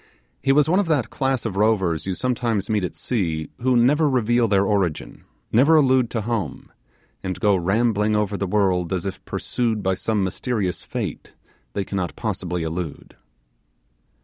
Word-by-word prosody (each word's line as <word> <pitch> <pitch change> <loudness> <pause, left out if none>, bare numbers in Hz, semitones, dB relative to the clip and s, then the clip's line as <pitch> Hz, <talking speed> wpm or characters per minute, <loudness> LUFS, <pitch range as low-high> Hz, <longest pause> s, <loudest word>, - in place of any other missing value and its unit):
He 135 - +2
was 150 +2 +4
one 180 +4 +3
of 200 - 0
that 145 -8 0
class 135 -3 -1
of 105 -4 -3
rovers 95 -6 +1
you 95 - -1
sometimes 115 -4 -1
meet 105 -3 +1
at 90 - -3
sea, 80 -10 -2
who 125 0 +3
never 145 +6 +4
reveal 120 -2 +2
their 100 -1 +3
origin, 95 -6 -1 0.3
never 140 +8 +5
allude 130 -5 +4
to 115 - -2
home, 105 - -3 0.5
and 95 -1 -4
go 105 -3 +3
rambling 105 +3 +1
over 105 -1 0
the 100 -1 -2
world 90 -3 +1
as 90 -1 -2
if 95 - -5
pursued 115 -4 -2
by 95 0 +2
some 105 +2 -1
mysterious 95 -1 -2
fate - - -5 0.4
they 100 - -1
cannot 95 -3 -3
possibly 90 -6 -3
elude. 80 -1 -5
105 Hz, 165 wpm, -23 LUFS, 95-120 Hz, 0.5 s, never